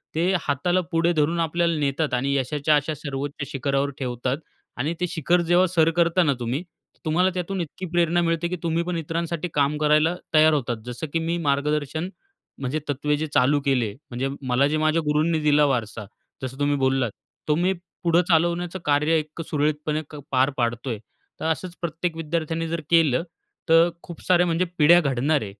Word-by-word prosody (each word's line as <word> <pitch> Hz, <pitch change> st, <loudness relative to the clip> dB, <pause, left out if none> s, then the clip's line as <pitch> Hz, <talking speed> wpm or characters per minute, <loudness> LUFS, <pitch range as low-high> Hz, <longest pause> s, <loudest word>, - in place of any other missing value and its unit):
ते 175 Hz, +4 st, +2 dB
हाताला 175 Hz, +6 st, +1 dB
पुढे 165 Hz, +1 st, +2 dB
धरून 160 Hz, +2 st, +1 dB
आपल्याला 170 Hz, +1 st, +1 dB
नेतात 140 Hz, 0 st, 0 dB
आणि 135 Hz, +3 st, +1 dB
यशाच्या 145 Hz, +3 st, +1 dB
अशा 150 Hz, +2 st, 0 dB
सर्वोच्च 140 Hz, 0 st, -5 dB
शिखरावर 140 Hz, +1 st, 0 dB
ठेवतात 125 Hz, +1 st, -2 dB, 0.4 s
आणि 150 Hz, +7 st, -1 dB
ते 180 Hz, -, +1 dB
शिखर 170 Hz, +2 st, +1 dB
जेव्हा 175 Hz, +2 st, +4 dB
सर 165 Hz, -2 st, +3 dB
करता 170 Hz, +1 st, +3 dB
ना 145 Hz, -3 st, +2 dB
तुम्ही, 125 Hz, +8 st, -2 dB, 0.4 s
तुम्हाला 180 Hz, +4 st, +3 dB
त्यातून 185 Hz, +1 st, -3 dB
इतकी 170 Hz, +3 st, -6 dB
प्रेरणा 175 Hz, 0 st, +2 dB
मिळते, 165 Hz, 0 st, 0 dB
की 180 Hz, -, -3 dB
तुम्ही 165 Hz, 0 st, 0 dB
पण 175 Hz, -1 st, -3 dB
इतरांसाठी 165 Hz, +1 st, -3 dB
काम 145 Hz, +1 st, +1 dB
करायला 155 Hz, +3 st, +3 dB, 0.2 s
तयार 155 Hz, 0 st, +6 dB
होतात. 120 Hz, -5 st, -1 dB
जसं 125 Hz, +6 st, -5 dB
की 165 Hz, -, +2 dB
मी 165 Hz, +1 st, -1 dB
मार्गदर्शन, 150 Hz, +2 st, -1 dB, 0.5 s
म्हणजे 135 Hz, +3 st, -2 dB
तत्त्वे 145 Hz, +1 st, 0 dB
जे 155 Hz, +1 st, -2 dB
चालू 140 Hz, +3 st, +4 dB
केले. 125 Hz, -6 st, +1 dB, 0.2 s
म्हणजे 130 Hz, +3 st, -2 dB, 0.2 s
मला 130 Hz, +3 st, +3 dB
जे 155 Hz, +1 st, 0 dB
माझ्या 155 Hz, +1 st, +2 dB
गुरूंनी 155 Hz, +2 st, +2 dB
दिला 150 Hz, -1 st, +4 dB
वारसा 115 Hz, -5 st, -2 dB, 0.4 s
जसं 130 Hz, +1 st, -6 dB
तुम्ही 145 Hz, 0 st, +2 dB
बोललात, 130 Hz, -4 st, +1 dB, 0.4 s
तो 150 Hz, -, +3 dB
मी 180 Hz, +3 st, +2 dB, 0.3 s
पुढं 170 Hz, 0 st, +4 dB
चालवण्याचं 175 Hz, +2 st, +1 dB
कार्य 150 Hz, +2 st, +3 dB
इतकं 155 Hz, +2 st, -7 dB
सुरळीतपणे 150 Hz, +1 st, 0 dB, 0.3 s
पार 130 Hz, +1 st, +3 dB
पाडतोय. 120 Hz, 0 st, -1 dB, 0.4 s
तर -, -, -4 dB
असंच 170 Hz, +2 st, -2 dB
प्रत्येक 165 Hz, 0 st, -2 dB
विद्यार्थ्याने 165 Hz, 0 st, -2 dB
जर 165 Hz, 0 st, -3 dB
केलं, 165 Hz, -4 st, +4 dB, 0.5 s
तर 165 Hz, +1 st, +6 dB
खूप 170 Hz, -2 st, -10 dB
साऱ्या 180 Hz, -1 st, +5 dB
म्हणजे 170 Hz, +2 st, +1 dB
पिढ्या 165 Hz, +3 st, +7 dB
घडणार 140 Hz, +2 st, +1 dB
आहे. -, -, -3 dB
155 Hz, 175 wpm, -24 LUFS, 140-170 Hz, 0.5 s, पिढ्या